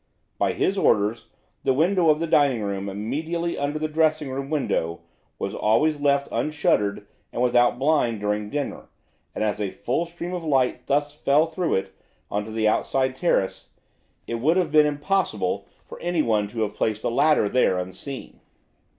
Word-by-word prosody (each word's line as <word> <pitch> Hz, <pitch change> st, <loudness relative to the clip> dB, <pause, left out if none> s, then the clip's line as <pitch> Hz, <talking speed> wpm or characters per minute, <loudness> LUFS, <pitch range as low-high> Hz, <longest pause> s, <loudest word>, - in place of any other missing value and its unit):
By -, -, +2 dB
his 195 Hz, +1 st, 0 dB
orders 105 Hz, -, +2 dB, 0.4 s
the 130 Hz, -, +2 dB
window 170 Hz, +3 st, +3 dB
of 150 Hz, 0 st, +4 dB
the 165 Hz, -, 0 dB
dining 140 Hz, -8 st, +3 dB
room 100 Hz, -1 st, -3 dB
immediately 160 Hz, -, -3 dB
under 145 Hz, +2 st, -2 dB
the 155 Hz, 0 st, -1 dB
dressing 155 Hz, -2 st, +1 dB
room 135 Hz, +1 st, -4 dB
window 85 Hz, -, -1 dB, 0.4 s
was -, -, -3 dB
always 145 Hz, +8 st, +2 dB
left 140 Hz, -1 st, +2 dB
unshuttered 105 Hz, -10 st, 0 dB, 0.3 s
and -, -, -5 dB
without 120 Hz, 0 st, +3 dB
blind 135 Hz, -5 st, +1 dB
during 105 Hz, 0 st, -2 dB
dinner, 145 Hz, +2 st, -4 dB, 0.5 s
and -, -, -1 dB
as 105 Hz, -1 st, -1 dB
a 100 Hz, -, -1 dB
full 145 Hz, -, -2 dB
stream 175 Hz, +1 st, -6 dB
of 175 Hz, -2 st, -4 dB
light 135 Hz, -5 st, +1 dB
thus 145 Hz, +1 st, +1 dB
fell 150 Hz, +1 st, +3 dB
through 165 Hz, +1 st, -1 dB
it 95 Hz, 0 st, -2 dB, 0.4 s
on 105 Hz, 0 st, -1 dB
to 110 Hz, -, -8 dB
the 110 Hz, 0 st, +1 dB
outside 130 Hz, +4 st, +1 dB
terrace, 130 Hz, -, 0 dB, 0.6 s
it 115 Hz, -, -3 dB
would 160 Hz, +9 st, +2 dB
have 175 Hz, -5 st, +1 dB
been 150 Hz, -1 st, +6 dB
impossible 195 Hz, +10 st, -1 dB, 0.2 s
for -, -, -11 dB
anyone 120 Hz, -12 st, +1 dB
to 110 Hz, +1 st, -2 dB
have 105 Hz, -1 st, -3 dB
placed 110 Hz, 0 st, -1 dB
a -, -, +1 dB
ladder 150 Hz, 0 st, +3 dB
there 100 Hz, -5 st, +2 dB
unseen." 95 Hz, +10 st, -7 dB
140 Hz, 170 wpm, -24 LUFS, 110-155 Hz, 0.6 s, been